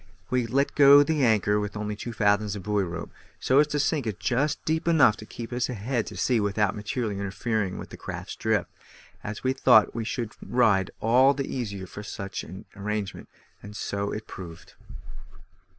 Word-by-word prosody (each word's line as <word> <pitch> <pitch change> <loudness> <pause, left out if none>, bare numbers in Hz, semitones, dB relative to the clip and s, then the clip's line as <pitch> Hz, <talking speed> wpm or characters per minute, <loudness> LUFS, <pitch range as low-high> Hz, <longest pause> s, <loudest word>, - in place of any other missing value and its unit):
We 125 -2 +1
let 140 +4 +1
go 145 0 +8
the 150 -1 0
anchor 105 -3 +3
with 105 0 -4
only 105 0 -3
two 120 +3 -6
fathoms 105 -1 +1
of 100 - -7
buoy 105 -1 0
rope, 85 -1 -6 0.3
so 130 +2 +3
as 150 - +5
to 150 0 -2
sink 145 -3 0
it 105 -1 -4
just 145 +5 0
deep 160 +1 -1
enough 155 -10 +5
to 110 - -11
keep 120 +1 -7
us 125 0 0
head 120 0 -2
to 105 - -8
sea 120 +4 +2
without 100 -1 0
materially 105 0 -3
interfering 100 0 -2
with - - -8
the - - -9
craft's - - -7
drift, - - 0 0.5
as 105 +1 -6
we 130 0 +2
thought 125 -5 +5
we 115 - -3
should 115 -1 -3
ride 105 -7 +2
all 130 +5 +5
the 135 - -2
easier 100 -8 -4
for 100 - -9
such 100 -1 -6
an 95 - -10
arrangement, 105 0 -4 0.3
and 105 +1 -10
so 100 -1 -3
it 110 - -5
proved. 85 -3 -10
110 Hz, 190 wpm, -26 LUFS, 100-130 Hz, 0.5 s, go